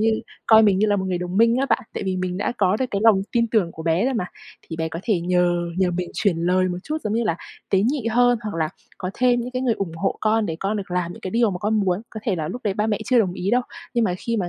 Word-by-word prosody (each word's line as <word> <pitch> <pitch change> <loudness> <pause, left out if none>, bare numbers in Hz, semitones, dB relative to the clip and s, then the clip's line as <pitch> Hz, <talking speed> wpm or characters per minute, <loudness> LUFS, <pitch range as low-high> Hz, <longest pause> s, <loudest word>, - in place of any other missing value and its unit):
như 220 0 +2 0.3
coi 220 -1 +7
mình 200 -3 +4
như 215 - +3
là 205 -1 +2
một 190 - -1
người 180 -1 -1
đồng 180 +1 -4
minh 230 +2 +5
á 270 - +1
bạn, 260 - +2
tại - - -3
vì 190 -1 -1
mình 180 -1 -2
đã 200 - -1
có 195 0 +3
được 260 - -1
cái 200 - -1
lòng 210 -4 +5
tin 235 -1 +2
tưởng 190 -7 +2
của 160 - -8
bé 165 +5 +1
rồi 265 0 0
mà, 185 - 0 0.4
thì 160 - -8
bé 160 0 -2
có 165 - -6
thể 200 -6 +1
nhờ 180 0 +2 0.2
nhờ 185 -2 +3
mình 180 0 -3
chuyển 200 -6 +1
lời 185 +1 +3
một 180 0 -3
chút, 305 - -2
giống 215 - -2
như 230 +1 +1
là 190 -7 0 0.3
tế 195 - +4
nhị 250 +1 0
hơn, 245 +1 +4
hoặc 210 - -4
là 160 -2 0 0.3
có 185 - -3
thêm 245 -1 +3
những 245 - -5
cái 255 0 -2
người 240 -3 +2
ủng 185 -6 -4
hộ 195 +4 -1
con, 220 0 +2
để 160 -3 -3
con 205 +2 -1
được 195 -3 -6
làm 175 -1 -1
những - - -12
cái 185 - -5
điều 230 -1 +3
mà 180 - -4
con 210 +4 0
muốn. 190 0 0
Có 220 - -7
thể 210 -5 0
là 155 -2 -3
lúc 250 - -5
đấy 200 -2 0
ba 210 +2 0
mẹ 215 -2 0
chưa 255 -2 +3
đồng 195 -6 +2
ý 185 +2 -2
đâu, 245 +2 +3 0.3
nhưng 235 -1 +3
mà 180 - 0
khi 230 +3 -2
mà 180 -5 -1
200 Hz, 320 wpm, -22 LUFS, 180-230 Hz, 0.4 s, coi